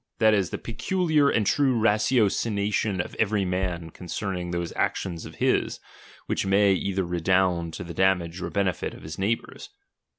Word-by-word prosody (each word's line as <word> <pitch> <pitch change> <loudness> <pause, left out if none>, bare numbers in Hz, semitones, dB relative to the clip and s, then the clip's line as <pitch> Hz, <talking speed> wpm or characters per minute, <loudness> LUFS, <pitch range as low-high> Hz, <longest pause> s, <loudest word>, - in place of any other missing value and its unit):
that 110 -2 +5
is, 95 -5 +1
the - - -4
peculiar 155 +4 +1
and 110 -5 +1
true 130 0 +2
ratiocination 105 -2 +1
of 90 - -3
every 105 -2 +2
utan 90 -3 -2
ootiwrning 90 0 -4
those 85 -1 -3
actions 85 -3 -2
of - - -12
his, - - +1 0.5
which - - -1
may 100 +1 +4
either 95 0 -1
redound 90 -1 +1
10 85 - -6
the 85 - -7
dantajFf 90 -1 +1
or - - -3
benefit 95 -3 -1
of - - -13
his 80 +2 -7
neighbours. 115 - -2
95 Hz, 160 wpm, -26 LUFS, 90-110 Hz, 0.5 s, that